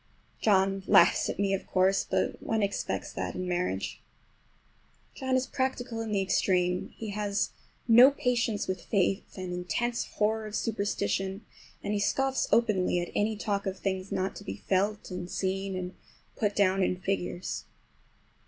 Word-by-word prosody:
John 195 -2 +3
laughs 170 - +5
at - - -3
me, 195 -1 +1
of 195 - -3
course, 190 +1 +3
but - - 0
one 220 -2 0
expects 200 0 -2
that - - -3
in 185 0 -3
marriage. 175 - -2 1.1
John 260 -1 -1
is 255 0 +2
practical 250 -4 -2
in 225 -1 -4
the 200 -2 +2
extreme. 180 -2 +1
He 220 - -5
has 205 0 -1 0.4
no 240 +3 +9
patience 245 -6 0
with 185 -2 -2
faith, 195 -1 0
an 185 -1 -4
intense 230 +7 -1
horror 215 +1 +1
of 210 - -6
superstition, 200 -2 -1 0.4
and 205 - -1
he 205 - +1
scoffs 270 +5 +1
openly 210 -6 +3
at 175 - -4
any 215 +1 +1
talk 200 -2 -1
of 190 0 -2
things 190 0 -3
not 190 +1 -1
to - - -9
be 200 - -5
felt 200 +2 -1
and 180 -1 -5
seen 195 +1 -2
and 185 0 -4 0.4
put 210 -2 0
down 195 -1 +3
in 185 - +2
figures. 185 -2 -3
200 Hz, 160 wpm, -29 LUFS, 185-220 Hz, 1.1 s, no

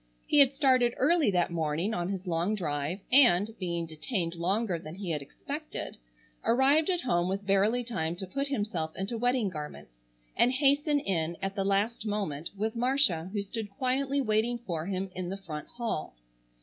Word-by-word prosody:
He 295 - +3
had 275 -2 +7
started 255 -4 +3
early 315 -2 +3
that 180 -3 +1
morning 165 +5 -1
on 175 -1 -1
his 190 -1 -4
long 175 +4 0
drive, 155 0 -2
and, 225 -6 +5
being 170 -3 -2
detained 165 +2 -3
longer 185 +2 0
than 155 +1 -9
he 190 -3 -4
had 150 -2 -1
expected, 290 - -6 0.5
arrived 275 +7 +4
at 355 -2 +1
home 175 -7 +1
with 195 +1 -3
barely 205 +5 +3
time 170 -9 -2
to 190 +2 -5
put 275 +9 -2
himself 205 - -2
into 195 +5 -3
wedding 245 -2 +1
garments, 150 - -8 0.4
and 250 - +4
hasten 290 +2 +3
in 170 - -1
at 195 0 -3
the 195 -1 -1
last 200 +4 +1
moment 190 -8 -2
with 220 +3 -1
Marcia 235 - +1
who 205 -1 -1
stood 215 +1 -5
quietly 265 +6 0
waiting 225 0 +1
for 175 -8 -4
him 190 -1 -2
in 180 -1 -4
the 195 - -4
front 160 -6 -7
hall. 230 - -4
200 Hz, 175 wpm, -29 LUFS, 175-245 Hz, 0.5 s, had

